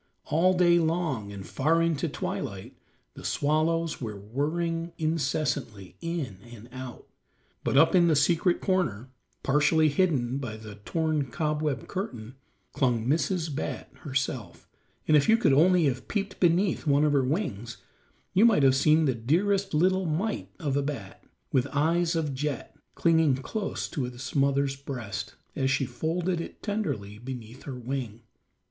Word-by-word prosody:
All 175 Hz, +5 st, +3 dB
day 175 Hz, -1 st, +5 dB
long, 160 Hz, -11 st, -1 dB
and 100 Hz, -2 st, -8 dB
far 160 Hz, +5 st, +1 dB
into 165 Hz, -4 st, +1 dB
twilight, -, -, -5 dB, 0.4 s
the -, -, -11 dB
swallows 160 Hz, +2 st, 0 dB
were 105 Hz, -4 st, -5 dB
whirring 165 Hz, -, -2 dB
incessantly, 135 Hz, -, -2 dB
in 165 Hz, -, -4 dB
and 115 Hz, -1 st, -11 dB
out. 130 Hz, -1 st, -8 dB, 0.6 s
But -, -, +1 dB
up 160 Hz, +3 st, +6 dB
in 175 Hz, -2 st, +5 dB
the 160 Hz, -, +4 dB
secret 170 Hz, +5 st, +2 dB
corner, 135 Hz, -, 0 dB, 0.3 s
partially 150 Hz, +3 st, +3 dB
hidden 140 Hz, -6 st, +1 dB
by 115 Hz, -5 st, -5 dB
the 110 Hz, -1 st, -9 dB
torn 155 Hz, +7 st, -1 dB
cobweb 150 Hz, 0 st, -1 dB
curtain, 125 Hz, -, -5 dB, 0.4 s
clung 120 Hz, -4 st, +1 dB
Mrs. 160 Hz, +3 st, 0 dB
Bat 140 Hz, -, -4 dB
herself, 130 Hz, -, -3 dB, 0.4 s
and 155 Hz, -, +5 dB
if 145 Hz, +5 st, +4 dB
you 225 Hz, -, +7 dB
could 225 Hz, -, +3 dB
only 175 Hz, +4 st, +5 dB
have 130 Hz, -2 st, -1 dB
peeped 200 Hz, -2 st, -3 dB
beneath 175 Hz, 0 st, +2 dB
one 145 Hz, +1 st, +4 dB
of 150 Hz, -, +2 dB
her 140 Hz, -2 st, +3 dB
wings 120 Hz, -, -2 dB, 0.6 s
you 195 Hz, -, +5 dB
might 220 Hz, -11 st, +5 dB
have 135 Hz, -1 st, +5 dB
seen 155 Hz, +3 st, +4 dB
the 135 Hz, -, +2 dB
dearest 190 Hz, -, +1 dB
little 185 Hz, +4 st, +2 dB
mite 190 Hz, +8 st, -2 dB
of 145 Hz, -6 st, -2 dB
a 140 Hz, -, +2 dB
bat, 135 Hz, -10 st, -6 dB, 0.3 s
with 130 Hz, 0 st, +2 dB
eyes 165 Hz, +4 st, +1 dB
of 155 Hz, -4 st, -1 dB
jet, 145 Hz, +2 st, -4 dB, 0.2 s
clinging 160 Hz, -5 st, +3 dB
close 200 Hz, -, -3 dB
to 140 Hz, -7 st, -2 dB
its 125 Hz, +1 st, -7 dB
mother's 140 Hz, 0 st, +2 dB
breast 125 Hz, -7 st, -6 dB, 0.2 s
as 135 Hz, -1 st, +1 dB
she 135 Hz, 0 st, +1 dB
folded 165 Hz, +8 st, -1 dB
it -, -, -9 dB
tenderly 110 Hz, -, -3 dB
beneath 125 Hz, 0 st, -8 dB
her 135 Hz, -, -5 dB
wing. 120 Hz, -3 st, -5 dB
150 Hz, 155 wpm, -27 LUFS, 130-170 Hz, 0.6 s, you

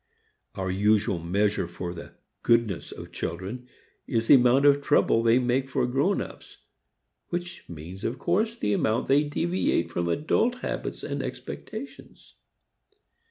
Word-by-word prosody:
Our 95 Hz, -1 st, -2 dB
usual 100 Hz, -1 st, +2 dB
measure 100 Hz, +3 st, 0 dB
for 85 Hz, 0 st, -6 dB
the 85 Hz, -, -10 dB, 0.3 s
"goodness" 115 Hz, -6 st, +1 dB
of -, -, -9 dB
children 95 Hz, +9 st, -5 dB, 0.4 s
is 115 Hz, -1 st, 0 dB
the -, -, +7 dB
amount 130 Hz, +1 st, +5 dB
of 145 Hz, 0 st, +5 dB
trouble 140 Hz, -5 st, +3 dB
they 115 Hz, +1 st, +4 dB
make 130 Hz, +1 st, +1 dB
for 130 Hz, -2 st, +1 dB
grownups, 135 Hz, +11 st, -2 dB, 0.7 s
which 175 Hz, +1 st, -5 dB
means 85 Hz, +4 st, -9 dB
of 120 Hz, -, -2 dB
course 215 Hz, +6 st, 0 dB
the 105 Hz, -, -1 dB
amount 110 Hz, +2 st, +1 dB
they 140 Hz, +2 st, +4 dB
deviate 165 Hz, -, 0 dB
from 85 Hz, 0 st, -1 dB
adult 225 Hz, -, +1 dB
habits -, -, -4 dB
and -, -, -3 dB
expectations. -, -, -8 dB
120 Hz, 135 wpm, -26 LUFS, 95-145 Hz, 0.7 s, the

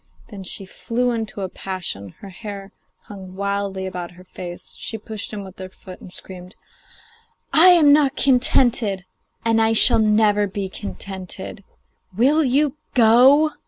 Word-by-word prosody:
Then 205 Hz, -4 st, -9 dB
she 190 Hz, +1 st, -6 dB
flew 245 Hz, +6 st, -2 dB
into 220 Hz, -3 st, -4 dB
a 190 Hz, -, -2 dB
passion, 175 Hz, -, -5 dB
her 200 Hz, -, -9 dB
hair 195 Hz, 0 st, -8 dB, 0.3 s
hung 190 Hz, -2 st, -11 dB
wildly 200 Hz, -1 st, -2 dB
about 180 Hz, -2 st, -5 dB
her 180 Hz, +1 st, -16 dB
face, 175 Hz, -1 st, -9 dB
she 225 Hz, -, -6 dB
pushed 215 Hz, -1 st, -7 dB
him 205 Hz, -2 st, -6 dB
with 190 Hz, -1 st, -13 dB
her 185 Hz, 0 st, -7 dB
foot 185 Hz, 0 st, -13 dB
and 180 Hz, -, -12 dB
screamed: 180 Hz, 0 st, -10 dB, 1.0 s
'I 330 Hz, +4 st, +8 dB
am 330 Hz, -5 st, +7 dB
not 290 Hz, -2 st, +3 dB
contented, 240 Hz, -7 st, +2 dB, 0.4 s
and 225 Hz, 0 st, +3 dB
I 225 Hz, 0 st, +3 dB
shall 230 Hz, +1 st, +5 dB
not 210 Hz, -2 st, +2 dB
be 195 Hz, -2 st, -3 dB
contented! 190 Hz, -, -7 dB, 0.5 s
Will 290 Hz, +7 st, +4 dB
you 285 Hz, +2 st, +1 dB, 0.2 s
go? 255 Hz, +6 st, +6 dB
205 Hz, 150 wpm, -21 LUFS, 190-240 Hz, 1.0 s, I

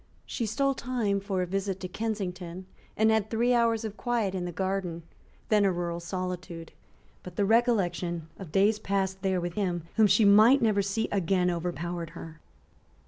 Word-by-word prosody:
She 230 Hz, -, -3 dB
stole 275 Hz, +5 st, +1 dB
time 235 Hz, -6 st, -1 dB
for 195 Hz, -2 st, -2 dB
a -, -, -1 dB
visit 195 Hz, +1 st, -2 dB
to 185 Hz, -, -3 dB
Kensington, 185 Hz, -3 st, -4 dB, 0.3 s
and 220 Hz, +1 st, +4 dB
had 220 Hz, -1 st, +1 dB
three 235 Hz, +2 st, +2 dB
hours 230 Hz, -2 st, +2 dB
of 215 Hz, -1 st, -6 dB
quiet 235 Hz, -6 st, -1 dB
in 180 Hz, -2 st, -3 dB
the 175 Hz, -, -4 dB
garden, 185 Hz, -2 st, -3 dB, 0.5 s
then 210 Hz, -2 st, +4 dB
a 195 Hz, -, +3 dB
rural 170 Hz, -1 st, -3 dB
solitude, 180 Hz, -1 st, -5 dB, 0.5 s
But 180 Hz, -1 st, -10 dB
the 200 Hz, -, +1 dB
recollection 185 Hz, -7 st, +1 dB
of 185 Hz, -6 st, -9 dB
days 205 Hz, +4 st, +3 dB
passed 190 Hz, -2 st, -1 dB
there 190 Hz, -1 st, +1 dB
with 175 Hz, 0 st, -4 dB
him 175 Hz, -4 st, -1 dB
whom 220 Hz, -1 st, +6 dB
she 215 Hz, +2 st, +4 dB
might 215 Hz, +7 st, +7 dB
never 215 Hz, -3 st, +2 dB
see 200 Hz, +3 st, -1 dB
again 180 Hz, -2 st, +1 dB
overpowered 175 Hz, -1 st, -4 dB
her. 160 Hz, -1 st, -9 dB
195 Hz, 175 wpm, -28 LUFS, 175-220 Hz, 0.5 s, might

